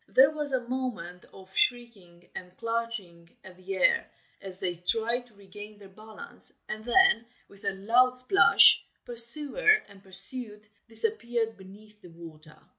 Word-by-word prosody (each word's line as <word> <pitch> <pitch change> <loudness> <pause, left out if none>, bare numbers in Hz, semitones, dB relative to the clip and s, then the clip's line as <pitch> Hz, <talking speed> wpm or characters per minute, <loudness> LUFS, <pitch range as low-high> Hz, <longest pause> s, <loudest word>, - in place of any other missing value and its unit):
There 270 +3 +4
was 300 -2 -5
a 250 -2 -3
moment 225 -9 -6
of 190 0 -17
shrieking 200 -9 -2
and 180 0 -11
clutching 230 -8 -6
at 185 -1 -15
the 185 +1 -8
air, 325 - +1 0.3
as 190 -1 -9
they 185 -3 -3
tried 230 +8 -2
to 220 - -26
regain 205 +2 -14
their 200 -2 -16
balance, 215 - -15 0.2
and 215 0 -7
then 380 - +3 0.2
with 200 +1 -18
a 200 - -2
loud 245 +6 +1
splash, 255 +10 +5 0.2
pursuer 280 - +2 0.2
and 200 -2 -18
pursued 210 +3 +3 0.2
disappeared 235 - -2
beneath 210 +2 -18
the 180 - -15
water. 160 -2 -15
215 Hz, 145 wpm, -26 LUFS, 190-245 Hz, 0.3 s, splash